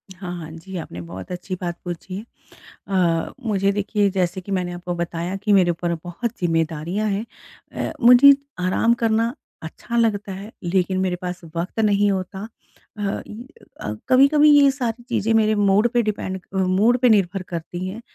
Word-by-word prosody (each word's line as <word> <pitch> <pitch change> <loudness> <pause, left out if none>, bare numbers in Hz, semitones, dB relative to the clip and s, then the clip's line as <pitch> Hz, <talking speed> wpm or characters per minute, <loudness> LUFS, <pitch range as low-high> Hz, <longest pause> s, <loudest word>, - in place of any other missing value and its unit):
हाँ, 180 -1 -7
हाँ। 160 -1 -8
जी, 165 +4 -10
आपने 90 - -7
बहुत 90 - -9
अच्छी 180 +1 -5
बात 175 -1 -3
पूछी। 175 +2 -5 0.7
अ, 175 -4 +1
मुझे 200 -2 +1
देखिए 205 0 0
जैसे 185 -1 -1
कि 195 +2 -7
मैंने 180 -2 -1
आपको 175 0 -5
बताया 170 +2 -3
कि 205 +2 0
मेरे 185 -3 +5
ऊपर 170 0 -1
बहुत 175 +7 -3
ज़िम्मेदारियाँ 165 +4 -1
हैं, 200 +2 -1 0.5
अ, - - -3
मुझे 250 +3 +9 0.3
आराम 185 +6 +2
करना 230 +1 +2 0.3
अच्छा 165 +8 -6
लगता 210 -4 +1
है 195 +3 -8
लेकिन 185 +1 +1
मेरे 185 -1 0
पास 180 0 -4 0.2
वक़्त 175 +6 -4
नहीं 205 -1 +3
होता। 190 +2 -4 0.5
अ, 200 -1 -2
इ 220 +3 -9 0.4
अ, 105 - -3 0.2
कभी-कभी 290 +3 +6
ये 280 -1 +6
सारी 245 -4 -3
चीज़ें 225 -2 0
मेरे 215 -1 +3
मूड 205 +2 +3
पे 240 -1 +3
डिपेंड 200 -3 -3
अ, - - -2
मूड 195 +6 +3
पे 250 0 +4
निर्भर 195 -3 +2
करती 175 +2 -5
हैं, 205 +5 -7
190 Hz, 170 wpm, -22 LUFS, 175-215 Hz, 0.7 s, मुझे